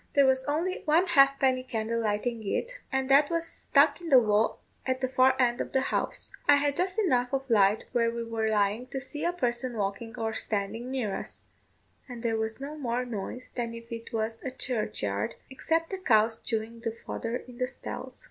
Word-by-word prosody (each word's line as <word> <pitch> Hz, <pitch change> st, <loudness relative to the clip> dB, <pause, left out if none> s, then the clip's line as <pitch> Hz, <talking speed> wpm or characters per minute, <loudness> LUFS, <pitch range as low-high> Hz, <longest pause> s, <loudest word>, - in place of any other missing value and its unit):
There 280 Hz, -1 st, +6 dB
was 260 Hz, 0 st, +3 dB
only 325 Hz, +6 st, -1 dB
one 320 Hz, +4 st, +4 dB
halfpenny 275 Hz, -5 st, +4 dB
candle 230 Hz, -2 st, -2 dB
lighting 225 Hz, +2 st, -1 dB
it, -, -, -2 dB
and 265 Hz, -1 st, 0 dB
that 285 Hz, +2 st, +6 dB
was 335 Hz, -1 st, 0 dB
stuck 285 Hz, +2 st, +2 dB
in 340 Hz, -, -6 dB
the 270 Hz, -, +8 dB
wall 215 Hz, -2 st, +3 dB, 0.3 s
at 260 Hz, -1 st, -1 dB
the 260 Hz, -, 0 dB
far 260 Hz, +1 st, +3 dB
end 240 Hz, -1 st, +2 dB
of -, -, -5 dB
the 265 Hz, -, +4 dB
house. -, -, -2 dB, 0.2 s
I 290 Hz, -, +9 dB
had 285 Hz, 0 st, +2 dB
just 370 Hz, +4 st, -1 dB
enough 250 Hz, -, +2 dB
of 270 Hz, -2 st, -2 dB
light 205 Hz, -1 st, +4 dB
where 235 Hz, -2 st, +2 dB
we 235 Hz, 0 st, -3 dB
were 225 Hz, -1 st, -1 dB
lying 210 Hz, +3 st, +1 dB
to 270 Hz, -, -4 dB
see 285 Hz, +2 st, -4 dB
a 345 Hz, -, +2 dB
person 245 Hz, -6 st, -2 dB
walking 205 Hz, +3 st, -3 dB
or 225 Hz, -1 st, -2 dB
standing 220 Hz, +3 st, -2 dB
near 250 Hz, -7 st, -1 dB
us: -, -, -3 dB, 0.7 s
and 245 Hz, -1 st, -8 dB
there 230 Hz, -1 st, +1 dB
was 220 Hz, +1 st, -2 dB
no 285 Hz, +3 st, -6 dB
more 250 Hz, -2 st, -1 dB
noise 245 Hz, +2 st, -6 dB
than 235 Hz, -2 st, -3 dB
if 230 Hz, +1 st, -11 dB
it 230 Hz, 0 st, -7 dB
was 225 Hz, 0 st, -2 dB
a 265 Hz, -, -3 dB
churchyard, 210 Hz, -, -2 dB, 0.2 s
except 325 Hz, +5 st, -1 dB
the 385 Hz, -, -3 dB
cows 225 Hz, -, +3 dB
chewing 225 Hz, 0 st, -3 dB
the 230 Hz, -1 st, -3 dB
fodder 230 Hz, +1 st, -3 dB
in 250 Hz, 0 st, -8 dB
the 255 Hz, -, +1 dB
stalls. -, -, -7 dB
245 Hz, 205 wpm, -28 LUFS, 225-275 Hz, 0.7 s, I